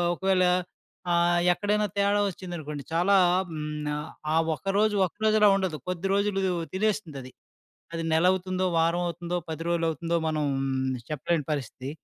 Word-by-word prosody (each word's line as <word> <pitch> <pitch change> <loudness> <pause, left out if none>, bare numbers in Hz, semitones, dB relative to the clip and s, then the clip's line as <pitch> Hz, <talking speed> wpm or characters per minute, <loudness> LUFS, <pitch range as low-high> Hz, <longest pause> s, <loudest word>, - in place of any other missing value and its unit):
ఒకవేళ 190 0 +2 0.7
ఆహ్, 175 0 +3
ఎక్కడైనా 210 +3 0
తేడా 200 +1 +3
వచ్చిందనుకోండి, 160 -6 -7
చాలా 180 +4 +3 0.4
హ్, - - -6 0.8
ఆ - - +2 0.2
ఒక్కరోజు 205 +4 +1
ఒక్కరోజులా 215 +3 +3
ఉండదు. 190 -5 -1
కొద్ది 180 +1 -2
రోజులు 200 -1 +1 0.3
తినేస్తుందది. 185 -10 -2 0.6
అది 165 - -2
నెలవుతుందో, 185 +2 +2
వారం 170 +2 +2
అవుతుందో 175 +1 -3
10 160 +1 -4
రోజులవుతుందో 165 0 0
మనం 155 -1 -1 0.7
చెప్పలేని 155 +1 -1
పరిస్థితి. 135 -1 -4
175 Hz, 115 wpm, -27 LUFS, 165-195 Hz, 0.8 s, ఆహ్